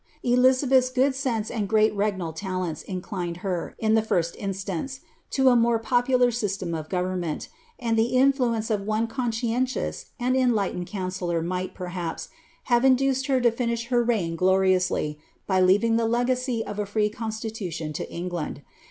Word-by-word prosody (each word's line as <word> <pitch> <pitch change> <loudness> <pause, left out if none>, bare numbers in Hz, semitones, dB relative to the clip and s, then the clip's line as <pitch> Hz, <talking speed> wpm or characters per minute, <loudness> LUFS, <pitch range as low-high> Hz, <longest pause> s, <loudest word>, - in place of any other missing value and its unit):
Elizabeth's 255 +1 +4
good 260 +2 +2
sense 245 -5 -2
and 210 -4 -2
great 215 0 +3
regnal 195 -5 -1
talents 185 -2 -3
inclined 180 -2 -4
her, 180 -3 -2
in 220 -1 +1
the 220 - +5
first 170 -6 0
instance, 195 - -4 0.3
to 265 -1 +2
a 245 - +5
more 235 0 +4
popular 245 +2 +2
system 200 -6 -2
of 155 -1 -5
government, 180 -3 -2 0.3
and 230 -3 0
the 225 +2 +1
influ 255 -2 +3
ence 220 0 -3
of 210 -2 +1
one 215 +2 0
conscientious 240 +1 -2
and 250 +1 +1
enlightened 215 -8 +1
counsellor 185 -3 -2
might, 185 +2 -3
perhaps, 180 -2 -5 0.3
have 240 -1 +2
induced 265 0 +3
her 265 -2 +3
to 240 -1 +4
finish 235 0 -2
her 240 -2 +3
reign 205 -9 0
gloriously, 185 -4 +2 0.3
by 190 -1 +2
leaving 205 +5 +4
the 230 -1 +1
legacy 245 0 0
of 210 0 -6
a 205 - -1
free 210 +1 +1
constitution 215 -8 -5
to - - -5
England. 170 -4 -4
220 Hz, 160 wpm, -25 LUFS, 185-245 Hz, 0.3 s, the